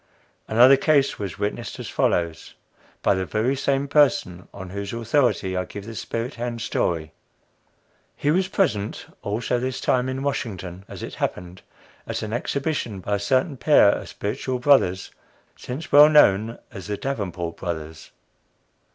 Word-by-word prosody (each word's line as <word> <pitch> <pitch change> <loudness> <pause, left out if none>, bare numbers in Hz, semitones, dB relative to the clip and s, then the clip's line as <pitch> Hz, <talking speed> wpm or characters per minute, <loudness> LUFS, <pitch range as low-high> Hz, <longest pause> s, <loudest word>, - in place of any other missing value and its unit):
Another 125 +5 +6
case 145 -2 +2
was 100 -4 -5
witnessed 105 +1 -3
as - - -7
follows, 85 -2 -1 0.5
by - - +4
the 95 -1 -1
very 110 +8 0
same 140 +1 0
person 130 - +2
on 95 -2 -9
whose 100 +1 -5
authority 115 -5 +1
I 90 0 -1
give 100 +2 -9
the 115 - -7
spirit 115 +3 -4
hand 120 0 -4
story. 80 -8 -1 1.0
He 145 - 0
was 185 +3 +2
present 110 - -1 0.2
also, 115 +4 -1
this 130 +1 -3
time 125 0 +1
in 130 +1 -3
Washington, 95 -9 -4
as - - -9
it - - -6
happened, 90 0 -4 0.5
at - - -3
an 110 0 -4
exhibition 135 -4 -2
by 100 +2 -1
a - - -7
certain 130 - +1
pair 145 -6 +5
of - - -2
spiritual 125 +5 -3
brothers, 125 -9 +3 0.4
since 135 +6 -7
well 145 +1 +9
known 115 -7 +4
as 100 -3 -9
the 105 -1 -3
"Davenport 90 -11 -4
Brothers." 80 -2 -6
115 Hz, 150 wpm, -23 LUFS, 95-135 Hz, 1.0 s, well